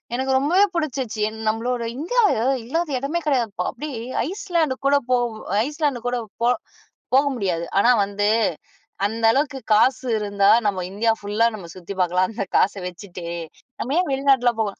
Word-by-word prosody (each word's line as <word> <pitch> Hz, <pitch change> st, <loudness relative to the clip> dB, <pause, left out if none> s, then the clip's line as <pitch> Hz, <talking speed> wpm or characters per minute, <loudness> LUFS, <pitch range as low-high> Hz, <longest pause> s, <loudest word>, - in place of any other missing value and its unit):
எனக்கு 265 Hz, +1 st, -1 dB
ரொம்பவே 355 Hz, +9 st, +4 dB
புடிச்சுச்சு, 265 Hz, -9 st, -2 dB
என் 220 Hz, -, -10 dB
நம்மளோட 235 Hz, +2 st, -1 dB
இந்தியா 475 Hz, -, +1 dB, 0.4 s
இல்லாத 330 Hz, +6 st, -1 dB
இடமே 285 Hz, +6 st, -2 dB
கிடையாதுப்பா, 240 Hz, -8 st, 0 dB
அப்டி 300 Hz, +5 st, -6 dB, 0.4 s
ஐஸ்லேண்ட் 345 Hz, -6 st, -1 dB
கூட 280 Hz, +1 st, +4 dB
போ 255 Hz, -, +4 dB, 0.5 s
ஐஸ்லேண்ட் 295 Hz, -3 st, -1 dB
கூட 245 Hz, 0 st, 0 dB, 0.2 s
போ 235 Hz, -, +3 dB, 0.6 s
போக 275 Hz, +2 st, +5 dB
முடியாது. 180 Hz, -7 st, -1 dB
ஆனா 240 Hz, -, +5 dB
வந்து, 205 Hz, +1 st, -1 dB, 0.8 s
அந்த 225 Hz, +3 st, -3 dB
அளவுக்கு 275 Hz, +2 st, 0 dB
காசு 255 Hz, +4 st, +3 dB
இருந்தா 200 Hz, -1 st, +2 dB, 0.2 s
நம்ம 200 Hz, -2 st, +1 dB
இந்தியா 225 Hz, +3 st, +1 dB
ஃபுல்லா 205 Hz, +3 st, +1 dB
நம்ம 190 Hz, -5 st, -9 dB
சுத்தி 185 Hz, +1 st, -7 dB
பார்க்கலாம். 180 Hz, +1 st, +2 dB
அந்த 225 Hz, -2 st, -3 dB
காச 200 Hz, -, +3 dB
வச்சுட்டு. 180 Hz, 0 st, -9 dB, 0.6 s
நம்ம 260 Hz, -, -2 dB
ஏன் 360 Hz, -, 0 dB
வெளிநாட்ல 270 Hz, -2 st, +3 dB
போகணும். 210 Hz, -3 st, -2 dB
245 Hz, 150 wpm, -22 LUFS, 205-280 Hz, 0.8 s, போக